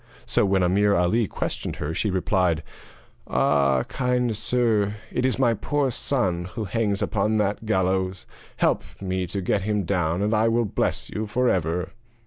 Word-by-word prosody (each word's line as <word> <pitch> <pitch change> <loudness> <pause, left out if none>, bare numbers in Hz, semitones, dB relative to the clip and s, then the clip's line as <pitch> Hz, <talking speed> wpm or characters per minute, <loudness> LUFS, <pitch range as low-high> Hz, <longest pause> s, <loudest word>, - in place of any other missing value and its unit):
So - - +2
when 95 -1 +2
Ameer 100 +3 +3
Ali 100 +6 +2
questioned - - -4
her, 75 +2 -4
she 105 +5 0
replied: 90 -3 +1 0.6
'Ah, 70 -3 +2
kind 125 -3 0
sir, 110 -2 +1 0.2
it 125 +1 +1
is 130 - 0
my 120 -3 +3
poor 140 +4 0
son 95 -10 -1
who 115 - -2
hangs 105 0 0
upon 110 +1 0
that 105 +1 -1
gallows; 95 -2 0 0.3
help - - +2 0.2
me 95 -1 -2
to 95 +3 -3
get 95 +2 0
him 105 0 0
down 90 0 0
and 105 +2 +1
I 110 +1 +3
will 115 +1 +2
bless - - -2
you 110 0 -3
for 125 +4 +1
ever.' 85 0 -1
100 Hz, 165 wpm, -24 LUFS, 90-115 Hz, 0.6 s, Ameer